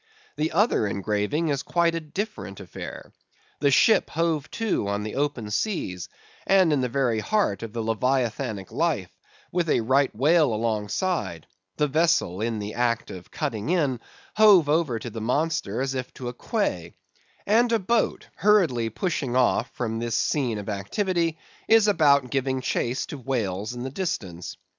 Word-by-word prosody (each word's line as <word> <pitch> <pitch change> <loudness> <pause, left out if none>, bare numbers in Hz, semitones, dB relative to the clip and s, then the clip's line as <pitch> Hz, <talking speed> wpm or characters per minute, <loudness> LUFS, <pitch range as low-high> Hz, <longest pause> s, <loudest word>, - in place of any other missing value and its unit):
The 155 +1 -1
other 195 - +2
engraving 105 - -1
is 140 -1 0
quite 170 +2 +1
a 165 - -1
different 165 - -5
affair: 95 - -9 0.5
the 140 - +3
ship 220 +10 +4
hove 160 -2 -1
to 220 - -1
upon 100 +1 -1
the 110 - -5
open 135 -7 -2
sea, 170 - -1 0.5
and 185 -5 +5
in 140 - +2
the 125 - -1
very 120 -3 +1
heart 200 - 0
of 115 -2 -6
the 115 0 -3
Leviathanic 115 -2 -1
life, 150 - -1 0.4
with 170 -2 0
a - - +3
Right 130 +4 +3
Whale 145 0 +3
alongside; 110 - -2 0.3
the 150 - +2
vessel 155 - +1
(in 115 0 -1
the 105 0 -5
act 120 -1 0
of 90 -2 -10
cutting 110 +2 -3
in) 145 -9 +1 0.4
hove 205 -7 +7
over 150 -6 +2
to 120 - -6
the 110 - -6
monster 125 -3 -1
as 135 0 -1
if 130 -1 -4
to 125 -2 -5
a - - -7
quay; 105 - -2 0.5
and 230 +3 +3
a 230 - +4
boat, 225 +3 0
hurriedly 170 - +3
pushing 135 - -2
off 125 -1 +2
from 115 -2 -2
this 115 -1 -2
scene 125 -7 0
of 105 - -7
activity, 165 - -1 0.3
is 225 -1 +5
about 140 - +4
giving 130 -1 0
chase 125 0 -1
to 145 - -8
whales 110 -4 -2
in 120 - -5
the 130 - -4
distance. 95 - -4
130 Hz, 165 wpm, -25 LUFS, 110-165 Hz, 0.5 s, hove